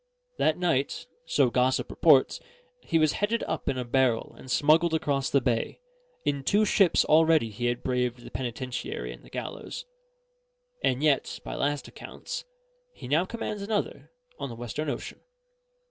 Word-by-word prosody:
That 155 - +3
night 145 -7 0 0.2
(so 130 -4 +3
gossip 130 +1 +1
reports) - - +4 0.4
he 165 - 0
was 155 -2 +4
headed 220 +3 0
up 160 - -2
in 130 - -1
a 125 - -2
barrel 120 -2 +1
and 130 - -13
smuggled 160 +5 +4
across 140 -4 0
the 140 - +3
bay: 120 -2 -1 0.5
in 140 -1 0
two 205 +9 +3
ships 195 -4 +4
already 160 -6 +4
he 120 +4 -2
had 120 0 -2
braved 125 -1 -1
the - - -10
penitentiary 120 - -4
and - - -15
the - - -15
gallows; - - -6 1.0
and 130 +3 +1
yet, 150 -3 +1
by - - -5
last 145 0 -1
accounts, - - -7 0.5
he - - -10
now 155 +7 +2
commands 215 -1 -4
another 205 0 -2 0.3
on 140 - -4
the 115 - -7
Western 120 +6 -4
Ocean. - - -5
140 Hz, 160 wpm, -27 LUFS, 125-160 Hz, 1.0 s, reports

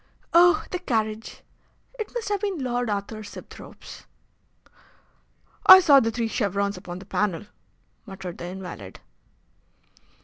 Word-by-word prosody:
"Oh! 355 +5 +5
the 360 - -2
carriage! 220 -8 -3 0.6
It 435 - -4
must 460 -3 -3
have 410 -2 -1
been 400 -4 -2
Lord 245 -2 -1
Arthur 205 +1 -4
Sibthorpe's." 205 - -12 1.6
"I 375 - +12
saw 290 -7 +6
the 225 - 0
three 230 0 -2
chevrons 200 -2 -1
upon 180 -1 -8
the 190 - -11
panel," 200 -3 -2 0.6
muttered 190 -3 -8
the - - -6
invalid. 180 - -9
220 Hz, 125 wpm, -24 LUFS, -, 1.6 s, I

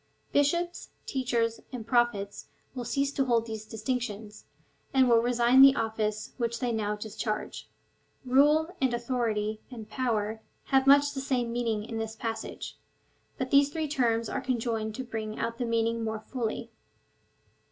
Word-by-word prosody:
Bishops, 340 +5 +1 0.2
teachers, 235 -3 0
and 245 -4 -6
Prophets 230 -4 0 0.3
will 250 -2 -5
cease 275 +3 0
to 275 -1 0
hold 235 -2 +2
these 220 -1 -6
distinctions, 220 -2 -4 0.5
and 260 -1 +6
will 230 -1 +5
resign 240 +2 +4
the 275 0 +9
office 215 -1 -2
which 235 -2 -1
they 245 -2 0
now 210 -2 -1
discharge. 215 0 -4 0.6
Rule, 300 +7 +4
and 260 -2 +2
authority, 225 -3 -1
and 225 -4 -9
potuer 220 -4 -1 0.3
have 270 0 +3
much 285 +1 +6
the 270 - -3
same 245 -3 -1
meaning 230 -3 -1
in 225 0 -4
this 220 0 -4
passage; 225 0 -5 0.6
but 260 -1 -3
these 280 0 +6
three 315 0 -2
terms 230 -5 +1
are 275 - -3
conjoined 230 -4 -2
to 260 - -4
bring 220 -3 -5
out 230 0 -3
the 245 - 0
meaning 230 0 0
more 220 -1 -3
fully. 230 -1 -4
235 Hz, 150 wpm, -29 LUFS, 220-260 Hz, 0.6 s, the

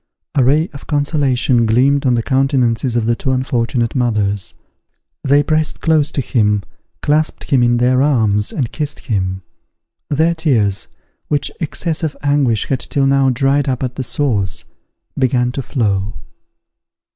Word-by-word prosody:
A 135 - +3
ray 150 +6 +3
of 140 - -11
consolation 135 -5 +1
gleamed 135 +5 +3
on 125 - +3
the 115 - -1
countenances 130 -3 +1
of 115 -2 +1
the 120 +1 +2
two 135 - -4
unfortunate 120 -2 -1
mothers. 105 -6 -1 0.7
They 145 +2 +4
pressed 155 +1 0
close 155 -3 +2
to 140 - 0
him, 105 -6 +1 0.4
clasped 155 +1 0
him 135 -3 +4
in 120 0 +3
their 125 +2 +3
arms, 110 -8 +1
and 130 -6 -2
kissed 150 -2 -4
him: 95 -3 -2 0.7
their 160 +3 +2
tears, 120 - 0 0.4
which 145 -1 0
excess 160 +1 -2
of 155 -3 -3
anguish 140 -7 +1
had 130 - -1
till 140 -1 -1
now 135 0 +3
dried 135 +3 +1
up 130 0 -2
at 125 -1 -2
the - - -3
source, 115 - -1 0.5
began 125 -2 +1
to 135 - -4
flow. 105 -7 -1
130 Hz, 150 wpm, -17 LUFS, 115-145 Hz, 0.7 s, They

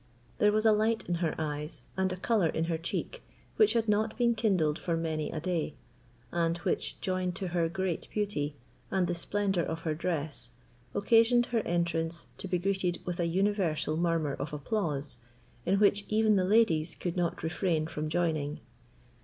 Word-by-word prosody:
There 210 - +5
was 215 +1 +1
a 220 - +7
light 220 +1 +1
in 175 - 0
her 160 -3 0
eyes 150 0 -4
and 190 0 +1
a 185 - -3
colour 200 -2 +2
in 160 - -1
her 165 0 0
cheek 470 - -4 0.4
which 430 - +5
had 230 -1 +1
not 215 +1 +1
been 240 -2 +3
kindled 185 -9 +1
for 170 -2 -1
many 160 -2 -2
a 160 - -3
day, 165 -3 -2 0.6
and 170 0 +1
which, 175 - -2
joined 185 -1 -1
to 185 0 -3
her 170 -1 +1
great 185 -1 -2
beauty, 155 -9 -1 0.3
and 190 -2 +2
the 175 - -1
splendour 195 +1 0
of 160 +1 -4
her 160 -2 -1
dress, 155 -6 -3 0.5
occasioned 230 +3 +5
her 230 - +3
entrance 170 -1 0
to - - -5
be 180 -1 +1
greeted 185 -1 0
with 180 -1 -3
an 170 -1 +1
universal 185 -4 +1
murmur 165 -3 +1
of 150 - -5
applause, 145 - -2 0.5
in 195 +2 +3
which 200 -1 +4
even 215 0 +4
the 185 -2 +3
ladies 180 -6 +3
could 175 -2 -3
not 175 -2 -1
refrain 160 -1 0
from 155 -1 -4
joining. 155 -3 0
175 Hz, 180 wpm, -30 LUFS, 160-205 Hz, 0.6 s, a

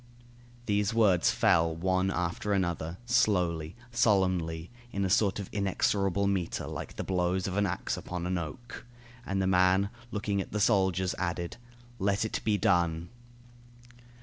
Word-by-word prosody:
These 105 0 +1
words 100 -7 +4
fell 80 0 +3
one 95 +2 +1
after 90 +2 -1
another, 85 -3 -1
slowly, 90 -8 +1 0.2
solemnly, 95 -7 +1 0.2
in 100 -4 -1
a 95 - -1
sort 100 -1 +3
of 100 -3 -5
inexorable 100 -1 +1
metre, 95 -4 -1
like - - -6
the - - -4
blows 90 0 0
of 95 - -3
an 100 0 +2
axe - - -2
upon 90 -1 -5
an 90 0 0
oak. 85 +10 -8 0.4
And 100 0 -1
the 95 - +1
man, 95 +2 +3 0.2
looking 105 -2 -1
at - - -8
the 105 - 0
soldiers, 95 -3 +2
added: 85 -1 -3 0.4
"Let 100 +2 +1
it 110 - -3
be 105 -2 +2
done." 85 -2 +1
95 Hz, 150 wpm, -29 LUFS, 90-100 Hz, 0.4 s, words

